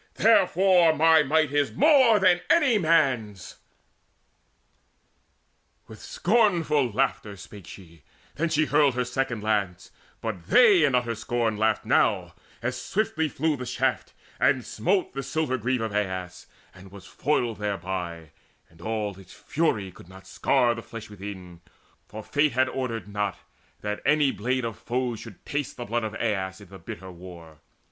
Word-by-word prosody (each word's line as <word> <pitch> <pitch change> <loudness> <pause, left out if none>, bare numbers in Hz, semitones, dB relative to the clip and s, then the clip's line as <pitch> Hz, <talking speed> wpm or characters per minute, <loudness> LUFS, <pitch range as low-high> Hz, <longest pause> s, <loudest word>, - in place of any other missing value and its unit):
Therefore 185 -5 +4
my 160 +1 +5
might 155 0 +1
is 145 -1 +1
more 270 -7 +5
than 185 -3 +3
any 285 -10 +4
man's." 130 - 0 2.3
With - - -12
scornful 170 - +1
laughter 105 -1 -1
spake 100 -1 -12
she: 85 -4 -13 0.3
then 165 +3 -1
she 155 -1 +2
hurled 145 -3 +3
Her 125 0 0
second 125 -3 -3
lance; 100 -5 -2 0.3
but 100 -7 -6
they 205 - +6
in 135 - +1
utter 120 -2 0
scorn 115 0 -1
Laughed 110 0 0
now, - - +1 0.3
as 125 0 -3
swiftly 160 - -1
flew 155 +2 -1
the 125 -2 -7
shaft, 125 +1 -1 0.3
and 130 -3 +2
smote 190 +2 -1
The 135 - -4
silver 135 -1 -2
greave 125 +2 -1
of 110 -2 -3
Aias, 95 -3 -4 0.3
and 95 0 -15
was 100 -2 -12
foiled 120 -5 -1
Thereby, 90 -5 -4 0.4
and 80 0 -19
all 105 -2 -3
its 95 -1 -15
fury 105 - -1
could 90 - -16
not 95 0 -14
scar 120 +4 +1
The 115 - -7
flesh 115 -2 -10
within; 95 -4 -9 0.5
for 110 +1 -9
fate 145 +3 +1
had 130 +1 +2
ordered 115 -7 -4
not 105 -3 -3 0.4
That 105 0 -4
any 150 -2 +3
blade 125 +3 -2
of 115 -2 -6
foes 125 -2 -3
should - - -12
taste 145 -1 -4
the 120 - -6
blood 115 +2 -2
Of 110 -1 -4
Aias 95 -4 -2
in 100 -4 -15
the 95 0 -12
bitter 95 +2 -9
war. 85 -3 -13
120 Hz, 155 wpm, -25 LUFS, 100-150 Hz, 2.3 s, they